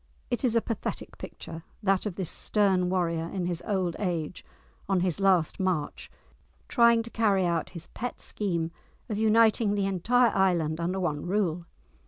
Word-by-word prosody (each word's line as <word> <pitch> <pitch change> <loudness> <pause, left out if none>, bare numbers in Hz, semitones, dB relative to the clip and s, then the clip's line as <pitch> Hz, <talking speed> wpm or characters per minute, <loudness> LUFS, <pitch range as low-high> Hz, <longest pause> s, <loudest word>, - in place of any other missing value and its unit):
It - - -1
is 240 -3 +2
a 230 - +4
pathetic 230 -4 -5
picture, 165 0 -8 0.2
that 195 +1 +2
of 190 - -5
this 185 -4 -3
stern 190 -4 +1
warrior 170 -3 0
in 185 -3 -2
his 175 -1 -2
old 185 -4 0
age, 175 -4 -2 0.5
on 190 -2 +2
his 180 -1 0
last 190 -4 +2
march, 185 -6 -2 0.6
trying 235 -2 +4
to 230 - -10
carry 200 -5 +2
out 170 -2 0
his 165 - -4
pet 245 +1 -5
scheme 170 -5 -2 0.4
of 210 -1 -2
uniting 220 -1 +4
the 200 -1 +1
entire 225 +5 +2
island 170 -5 +2
under 180 +3 -1
one 155 -4 -2
rule. 175 -4 0
190 Hz, 165 wpm, -28 LUFS, 170-210 Hz, 0.6 s, a